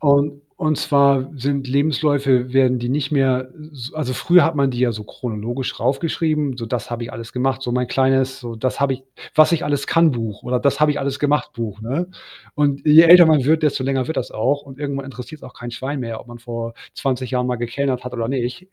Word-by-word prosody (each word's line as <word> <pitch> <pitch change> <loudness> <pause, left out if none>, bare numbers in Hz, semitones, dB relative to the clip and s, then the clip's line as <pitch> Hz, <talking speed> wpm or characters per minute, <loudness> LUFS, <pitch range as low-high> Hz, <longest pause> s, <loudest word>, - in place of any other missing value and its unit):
Und 145 0 +2 0.2
und 155 -2 +1
zwar 140 -2 +3
sind 135 +1 -2
Lebensläufe 140 -2 +1
werden 130 -1 +3
die 120 +1 -3
nicht 140 +1 -1
mehr 130 -2 +1 0.2
s 130 -2 -8
also, 150 -5 -3
früher 175 +5 +4
hat 165 -1 0
man 140 -2 +2
die 120 - -5
ja 125 -2 +2
so 105 -1 -7
chronologisch 120 +3 -5
rauf 130 +3 +1
geschrieben, 155 -5 -1
so: 115 - -5
„Das 120 0 -4
habe 120 0 -4
ich - - -7
alles 115 0 -8
gemacht.“ 130 +1 -1
so 125 -2 -3
mein 125 0 0
kleines 135 0 +1
so 120 -2 -7
das 125 +3 -2
habe 140 -1 +2
ich, 130 0 -9 0.3
„Was-ich-alles-kann-Buch“ 145 -7 +2
oder 125 0 -1
„Das-habe-ich-alles-gemacht-Buch“, 140 -6 0
ne? 140 +10 -2 0.5
Und 145 -2 0
je 155 +2 +9
älter 175 0 +9
man 150 -5 +3
wird, 160 +2 +3
desto 145 -3 +1
länger 130 -1 -1
wird 160 - -3
das - - -3
auch 145 +6 0
und 135 -1 -13
irgendwann 140 -2 -4
interessiert's 135 +4 -10
auch 125 - -11
kein 120 0 -8
Schwein 130 +4 -4
mehr, 115 -2 -5
ob - - -12
man 120 0 -11
vor 115 -1 -6 0.2
20 130 -2 -2
Jahren 125 -1 0
mal 125 - -1
gekellnert 125 +2 -2
hat 125 0 -7
oder 115 -1 -2
nicht. 130 +7 -3
135 Hz, 205 wpm, -20 LUFS, 125-145 Hz, 0.5 s, je